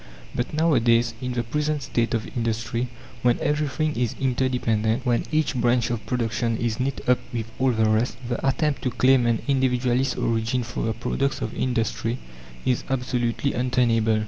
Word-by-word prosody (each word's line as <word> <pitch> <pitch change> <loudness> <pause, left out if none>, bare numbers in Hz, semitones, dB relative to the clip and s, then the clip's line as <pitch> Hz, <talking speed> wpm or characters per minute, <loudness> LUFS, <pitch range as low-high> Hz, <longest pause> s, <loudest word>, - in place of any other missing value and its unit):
But 120 - -2
nowadays, 120 -7 +3
in 125 -1 -2
the 120 -1 -1
present 150 +4 -1
state 120 0 0
of 110 - -2
industry, 115 +1 -1 0.3
when 120 0 +3
everything 150 +1 0
is 120 -1 -1
interdependent, 125 -2 +1
when 120 -1 +1
each 155 -2 +1
branch 120 -1 +2
of 115 -2 -3
production 115 -2 0
is 115 -2 -1
knit 135 +1 -1
up 125 0 +4
with 115 -1 -4
all 130 0 +3
the 110 -3 +2
rest, 110 +3 +1
the 120 - -3
attempt 140 +1 +1
to 130 - 0
claim 130 0 +4
an 115 -2 +1
Individualist 130 -1 +1
origin 115 +2 0
for 120 +1 -4
the 110 - 0
products 135 +4 -1
of - - -3
industry 120 -1 -1 0.5
is 125 -2 +1
absolutely 125 0 0
untenable. 120 -3 +2
120 Hz, 165 wpm, -24 LUFS, 115-130 Hz, 0.5 s, up